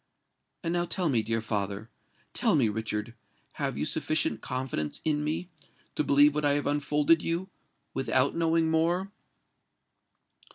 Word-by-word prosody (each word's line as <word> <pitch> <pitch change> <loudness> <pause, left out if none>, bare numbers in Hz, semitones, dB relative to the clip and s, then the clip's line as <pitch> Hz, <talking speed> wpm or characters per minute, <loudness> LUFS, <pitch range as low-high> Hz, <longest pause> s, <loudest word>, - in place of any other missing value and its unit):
And 170 0 -1
now 175 0 +1
tell 180 -1 -1
me, 120 -5 +2
dear 115 +1 -1
father—tell 105 0 -3
me, 125 -7 +3
Richard—have 110 +1 -5
you - - -1
sufficient 150 -8 0
confidence 125 - -3
in 150 -1 +1
me, 160 +4 -3 0.4
to - - 0
believe 145 +1 +5
what 150 0 -1
I 145 -1 +4
have 145 0 0
unfolded 150 +2 +2
you, 175 +3 -2 0.4
without 135 0 +1
knowing 165 -1 +2
more?" 175 +4 +1
145 Hz, 130 wpm, -28 LUFS, 115-165 Hz, 0.4 s, believe